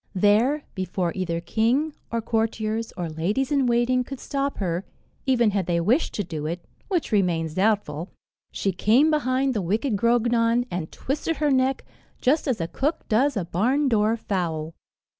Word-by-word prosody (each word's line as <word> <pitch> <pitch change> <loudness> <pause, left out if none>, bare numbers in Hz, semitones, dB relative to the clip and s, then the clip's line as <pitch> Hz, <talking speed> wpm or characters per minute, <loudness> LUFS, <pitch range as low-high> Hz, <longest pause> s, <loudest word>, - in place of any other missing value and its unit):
There, 220 +10 +3
before 185 -2 -2
either 175 -3 -2
king, 240 - +1 0.2
or 230 -1 -1
courtiers, 225 0 -1
or 175 -2 -2
ladies 195 - -1
in 275 -3 +2
waiting 240 +1 +2
could 275 +1 -8
stop 280 0 -2
her 180 -2 -1 0.4
even 240 -5 +3
had 195 -4 -1
they 170 -1 +1
wished 235 - +1
to 205 - -1
do 155 -4 -5
it, 170 +2 -5 0.2
which 355 -9 -1
remains 170 -6 +1
doubtful 190 -4 0 0.4
she 195 - -1
came 235 - +3
behind 265 -2 +1
the 210 - -1
wicked 215 +7 0
Grognon, 235 +1 +2
and 175 -3 -4
twisted 300 +4 -2
her 300 -2 +1
neck, 260 0 +1 0.3
just 295 +5 +2
as 255 -6 0
a 165 - -1
cook 290 - -2
does 255 +3 +2
a 185 - -1
barn 250 - +1
door 220 -1 +2
fowl. 165 -7 -2
225 Hz, 165 wpm, -24 LUFS, 180-260 Hz, 0.4 s, There